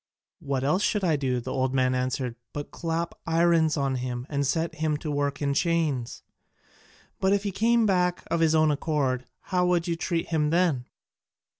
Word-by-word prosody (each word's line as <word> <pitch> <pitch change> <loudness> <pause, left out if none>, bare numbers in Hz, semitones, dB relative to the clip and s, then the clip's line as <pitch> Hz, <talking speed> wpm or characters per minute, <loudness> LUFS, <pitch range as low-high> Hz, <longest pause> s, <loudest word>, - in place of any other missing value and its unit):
"What 140 -5 -2
else 155 +8 +2
should 210 -1 +1
I 165 -4 +3
do," 130 -3 0
the 130 +2 -5
old 130 0 0
man 130 -1 +2
answered, 125 -1 -2 0.2
"but 145 0 -6
clap 165 0 -2
irons 165 -1 +3
on 135 -2 0
him 125 -1 -4
and 140 -1 0
set 165 +3 0
him 155 -2 +1
to 150 0 -5
work 145 0 -1
in 140 -1 +1
chains?" 155 -6 0 1.0
"But 190 +1 +3
if 200 0 +1
he 200 - -2
came 230 +3 +3
back 180 -3 +1
of 170 - +1
his 160 -1 +3
own 155 -1 +4
accord, 140 -4 -1 0.3
how 180 -1 +3
would 175 -1 +1
you 170 - 0
treat 165 0 -2
him 155 -2 +1
then?" 165 -7 +1
155 Hz, 185 wpm, -26 LUFS, 135-170 Hz, 1.0 s, own